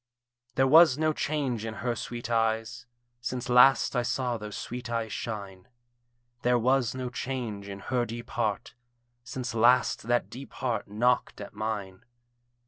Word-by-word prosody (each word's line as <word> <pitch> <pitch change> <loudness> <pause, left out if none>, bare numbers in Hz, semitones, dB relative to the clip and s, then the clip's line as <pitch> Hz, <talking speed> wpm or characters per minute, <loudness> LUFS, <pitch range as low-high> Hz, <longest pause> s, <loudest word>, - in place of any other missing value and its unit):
There 130 - +4
was 155 0 +7
no 155 0 +1
change 140 -8 -2
in 110 -1 -5
her 120 0 -2
sweet 120 +1 -5
eyes 115 0 -1 0.3
Since 125 +1 -4
last 130 +3 +5
I 125 - +3
saw 125 0 -1
those 105 -2 -7
sweet 125 0 -6
eyes 115 -2 -2
shine; 100 -4 -6 0.7
There 125 0 +3
was 125 0 +2
no 130 -1 -4
change 120 -7 -4
in 100 0 -7
her 120 +1 -1
deep 120 +1 -7
heart 110 -1 -2 0.5
Since 125 -1 -5
last 120 0 +3
that 120 0 +1
deep 135 +2 -9
heart 120 -5 -2
knocked 120 +5 +1
at 100 -1 -8
mine. 105 -4 -4
120 Hz, 150 wpm, -28 LUFS, 110-125 Hz, 0.7 s, was